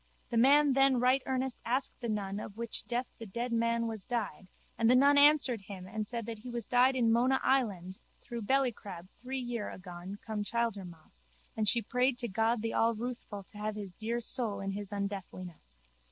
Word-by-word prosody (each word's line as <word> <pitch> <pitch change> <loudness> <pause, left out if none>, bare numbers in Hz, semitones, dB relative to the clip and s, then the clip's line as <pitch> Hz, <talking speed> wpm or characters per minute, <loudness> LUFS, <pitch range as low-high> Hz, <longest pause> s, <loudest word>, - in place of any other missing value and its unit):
The 235 - 0
man 280 +4 +6
then 270 -1 +4
right 255 +2 +3
earnest 260 -1 -2
asked 255 +3 0
the 235 - -4
nun 200 -2 -2
of 210 0 -8
which 235 -1 -4
death 245 +1 -1
the 225 - -7
dead 235 +5 -3
man 230 0 +1
was 220 -3 -3
died 215 -7 -3 0.3
and 230 0 +2
the 250 - +6
nun 280 +3 +6
answered 285 -5 +5
him 190 -2 -9
and 215 +1 -4
said 235 -1 -4
that 225 -1 -6
he 250 +4 -9
was 235 -3 -2
died 250 +3 +4
in 235 -3 +3
Mona 250 +3 +3
Island 195 -9 0 0.2
through 240 -1 -6
bellycrab 210 -7 -1
three 260 +2 -6
year 240 -4 -3
agone 180 +1 -8
come 215 -2 -2
Childermas 190 - -4 0.3
and 215 -2 +2
she 235 +1 +2
prayed 250 +3 +1
to 240 - 0
God 225 +2 0
the 225 - -1
Allruthful 230 -2 -1
to 205 - -14
have 215 0 -2
his 200 -3 -7
dear 230 +5 -2
soul 230 -4 +1
in 195 0 -3
his 200 0 -5
undeathliness. 185 - -6
230 Hz, 195 wpm, -31 LUFS, 200-250 Hz, 0.3 s, man